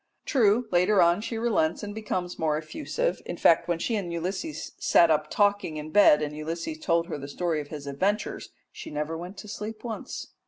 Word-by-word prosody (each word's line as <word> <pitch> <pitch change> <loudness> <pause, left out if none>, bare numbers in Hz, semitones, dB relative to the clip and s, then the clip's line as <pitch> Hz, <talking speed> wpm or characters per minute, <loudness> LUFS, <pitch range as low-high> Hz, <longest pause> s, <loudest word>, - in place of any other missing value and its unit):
True, 235 -3 +3
later 185 +3 +4
on 170 +3 +4
she 225 +1 -4
relents 210 -8 +1
and 205 0 -5
becomes 185 -5 -4
more 155 -2 +1
effusive; 315 - -2
in - - -6
fact, 165 - +4
when 175 -1 +1
she 225 +7 -1
and 190 -5 -3
Ulysses 190 - -4
sat 170 -2 +5
up 155 0 +1
talking 205 -6 +1
in 155 +1 -6
bed 155 -7 +6
and 150 0 -4
Ulysses 165 - -4
told 170 - +1
her 165 -4 -5
the 140 - -7
story 160 +1 -1
of 145 - -10
his 145 -1 -8
adventures, 190 +10 -1 0.2
she - - -9
never 150 +2 -3
went 180 +4 -7
to 210 - -9
sleep 215 +1 -6
once. 230 -3 -6
175 Hz, 200 wpm, -27 LUFS, 155-210 Hz, 0.2 s, bed